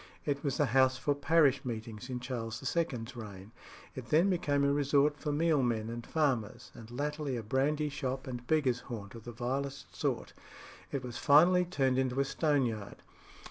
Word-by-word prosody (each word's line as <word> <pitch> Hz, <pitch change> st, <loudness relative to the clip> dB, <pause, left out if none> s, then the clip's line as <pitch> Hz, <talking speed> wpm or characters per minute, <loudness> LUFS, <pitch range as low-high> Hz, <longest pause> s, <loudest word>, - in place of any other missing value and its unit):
It 140 Hz, -1 st, -1 dB
was 135 Hz, -3 st, -1 dB
the -, -, +3 dB
house 130 Hz, +2 st, +3 dB
for 145 Hz, -, +1 dB
parish 145 Hz, -1 st, +3 dB
meetings 115 Hz, -1 st, -6 dB
in 125 Hz, -1 st, -3 dB
Charles 115 Hz, -3 st, -4 dB, 0.2 s
II.'s 130 Hz, -7 st, -2 dB
reign. 105 Hz, -3 st, -9 dB, 0.4 s
It 130 Hz, -3 st, -8 dB
then 170 Hz, +8 st, +4 dB
became 145 Hz, -5 st, +1 dB
a 140 Hz, 0 st, +3 dB
resort 145 Hz, +1 st, +2 dB
for 150 Hz, -, -2 dB
mealmen 135 Hz, -8 st, +1 dB
and 120 Hz, 0 st, -5 dB
farmers, 130 Hz, -9 st, -1 dB
and 115 Hz, -1 st, -12 dB
latterly 145 Hz, +1 st, -3 dB
a 115 Hz, -, -5 dB
brandy 145 Hz, +6 st, +1 dB
shop 135 Hz, -2 st, -3 dB
and 125 Hz, -2 st, -6 dB
beggars' 135 Hz, -6 st, +2 dB
haunt 105 Hz, -5 st, -6 dB
of 115 Hz, -2 st, -11 dB
the 120 Hz, -, -6 dB
vilest 135 Hz, +4 st, -4 dB
sort. -, -, -2 dB, 0.6 s
It 135 Hz, -3 st, -3 dB
was 120 Hz, -2 st, -6 dB
finally 175 Hz, +5 st, +6 dB
turned 135 Hz, -7 st, +1 dB
into 130 Hz, 0 st, 0 dB
a 140 Hz, -, +3 dB
stoneyard. 135 Hz, -8 st, -1 dB
135 Hz, 175 wpm, -32 LUFS, 120-145 Hz, 0.6 s, finally